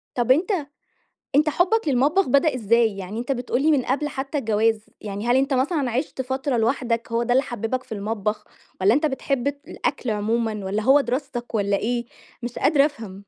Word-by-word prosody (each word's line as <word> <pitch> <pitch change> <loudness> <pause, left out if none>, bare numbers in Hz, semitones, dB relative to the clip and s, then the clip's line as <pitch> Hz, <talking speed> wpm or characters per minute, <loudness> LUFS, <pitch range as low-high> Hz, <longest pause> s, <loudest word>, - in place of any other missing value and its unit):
طَب 245 0 +2
أنت 345 +9 +3 0.8
أنت 305 +2 +4
حُبك 360 +4 +2
للمطبخ 285 +8 +2
بدأ 280 +2 +3
إزاي؟ 230 -2 +2
يعني 195 +4 -5
أنت 250 +3 -2
بتقول 245 +1 -1
لي 315 - +4
من 280 -4 +3
قبل 290 +3 0
حتى 275 +2 -3
الجواز، 220 -2 +1 0.2
يعني 205 +2 -5
هل 245 +1 +4
أنت 270 +1 +2
مثلًا 270 -1 0
عِشت 260 +2 -2
فترة 265 0 -2
لوحدك، 235 0 0
هو 230 +1 +1
ده 245 +1 0
اللي 265 +2 +4
حببك 240 +2 -3
في - - -12
المطبخ 210 0 -2 0.4
والّا 200 +5 +5
أنت 305 +2 +2
بتحب 275 -1 -1
الأكل 280 -3 -3
عمومًا 215 0 -1
والّا 205 +3 -1
هو 275 +5 +5
دراستك 250 -2 -4
والّا 200 -1 +1
إيه؟ 235 +2 -2 0.4
مش 240 0 -5
قادرة 285 0 +4
أفهم. 210 -9 -8
245 Hz, 185 wpm, -23 LUFS, 225-280 Hz, 0.8 s, والّا